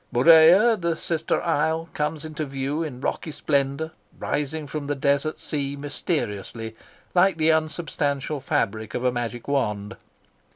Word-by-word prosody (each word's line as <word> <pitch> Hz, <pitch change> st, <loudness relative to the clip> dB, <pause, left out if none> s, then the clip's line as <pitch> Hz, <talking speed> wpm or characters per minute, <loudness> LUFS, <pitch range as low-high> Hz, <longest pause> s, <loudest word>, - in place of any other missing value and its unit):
Murea, 165 Hz, -, +7 dB
the 170 Hz, -1 st, +1 dB
sister 160 Hz, -1 st, -1 dB
isle, 160 Hz, 0 st, 0 dB
comes 150 Hz, +1 st, -2 dB
into 155 Hz, 0 st, -4 dB
view 140 Hz, +2 st, -2 dB
in 135 Hz, -6 st, -5 dB
rocky 160 Hz, -, -2 dB
splendour, 140 Hz, +1 st, -1 dB, 0.3 s
rising 150 Hz, +1 st, -2 dB
from 145 Hz, 0 st, -5 dB
the 145 Hz, -, 0 dB
desert 140 Hz, +3 st, 0 dB
sea 140 Hz, -2 st, -3 dB
mysteriously, 115 Hz, -, -3 dB, 0.4 s
like 180 Hz, -1 st, +4 dB
the 160 Hz, 0 st, +4 dB
unsubstantial 150 Hz, -2 st, -1 dB
fabric 110 Hz, -8 st, -1 dB
of 125 Hz, -, -2 dB
a 125 Hz, -, +3 dB
magic 120 Hz, -1 st, -4 dB
wand. 105 Hz, -8 st, -1 dB
145 Hz, 135 wpm, -24 LUFS, 135-160 Hz, 0.4 s, Murea